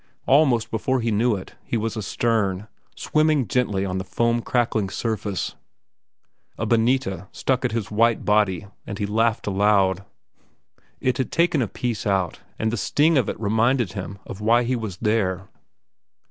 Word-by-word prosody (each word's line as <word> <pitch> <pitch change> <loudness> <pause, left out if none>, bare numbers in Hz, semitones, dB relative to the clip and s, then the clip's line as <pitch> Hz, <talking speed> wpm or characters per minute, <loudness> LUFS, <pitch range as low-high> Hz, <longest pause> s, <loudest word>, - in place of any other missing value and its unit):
Almost 135 -4 +3
before 130 +4 0
he 115 0 0
knew 110 +2 +2
it, 95 - -8
he 120 - -2
was 115 +1 -2
astern, 105 -2 -1 0.3
swimming 155 -5 +1
gently 100 -4 0
on 95 -1 -2
the - - -3
foam 115 +4 0
crackling 115 -5 0
surface. 105 -2 -3 1.0
A 110 - -2
bonita 115 -4 +1
struck 130 -1 -1
at 125 - 0
his 110 -3 -3
white 115 +2 +2
body, 105 -3 +2 0.2
and 100 - -5
he 105 - -1
laughed 110 +2 +1
aloud. 100 -2 +2 1.0
It 130 -1 0
had 130 - -1
taken 170 -4 +2
a 115 - 0
piece 115 0 -3
out, 95 -4 0 0.2
and 110 0 0
the 120 - -2
sting 155 +9 +2
of 130 -6 +2
it - - -5
reminded 115 +1 +1
him 100 0 -6
of 95 - -8
why 115 +3 +4
he 125 +2 0
was 110 -6 -5
there. 95 -4 0
110 Hz, 160 wpm, -23 LUFS, 100-120 Hz, 1.0 s, why